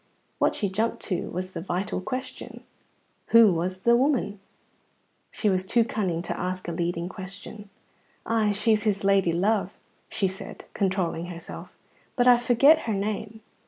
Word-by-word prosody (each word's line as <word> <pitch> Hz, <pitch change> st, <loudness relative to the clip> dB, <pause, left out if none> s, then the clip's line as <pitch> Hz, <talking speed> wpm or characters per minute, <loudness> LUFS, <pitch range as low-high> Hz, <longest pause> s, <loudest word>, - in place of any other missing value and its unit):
What -, -, +2 dB
she 205 Hz, -, -1 dB
jumped 215 Hz, +5 st, -1 dB
to 185 Hz, -, -2 dB
was 185 Hz, +1 st, -4 dB
the -, -, -5 dB
vital 185 Hz, +2 st, -2 dB
question, 255 Hz, +6 st, -6 dB, 0.6 s
Who 230 Hz, -4 st, +7 dB
was 185 Hz, +3 st, -2 dB
the 235 Hz, +3 st, +5 dB
woman? 250 Hz, -6 st, +1 dB, 0.9 s
But -, -, -15 dB
she 215 Hz, -, +1 dB
was 185 Hz, -2 st, +2 dB
too 230 Hz, +5 st, +3 dB
cunning 185 Hz, -7 st, -2 dB
to -, -, -4 dB
ask 185 Hz, 0 st, -3 dB
a -, -, -2 dB
leading 170 Hz, 0 st, -2 dB
question. 200 Hz, +2 st, -9 dB, 0.6 s
"Ay, 220 Hz, -2 st, +2 dB
she's 210 Hz, +1 st, +2 dB
his 210 Hz, -3 st, 0 dB
lady 195 Hz, -3 st, +3 dB
love," 195 Hz, +3 st, 0 dB, 0.3 s
she 195 Hz, -, 0 dB
said, 190 Hz, +1 st, -8 dB
controlling 185 Hz, -3 st, -1 dB
herself, 170 Hz, -1 st, -9 dB, 0.4 s
"but 245 Hz, -, +2 dB
I 245 Hz, -1 st, +8 dB
forget 250 Hz, +6 st, +5 dB
her 215 Hz, -, +1 dB
name. 215 Hz, +2 st, -3 dB
195 Hz, 160 wpm, -26 LUFS, 185-220 Hz, 0.9 s, I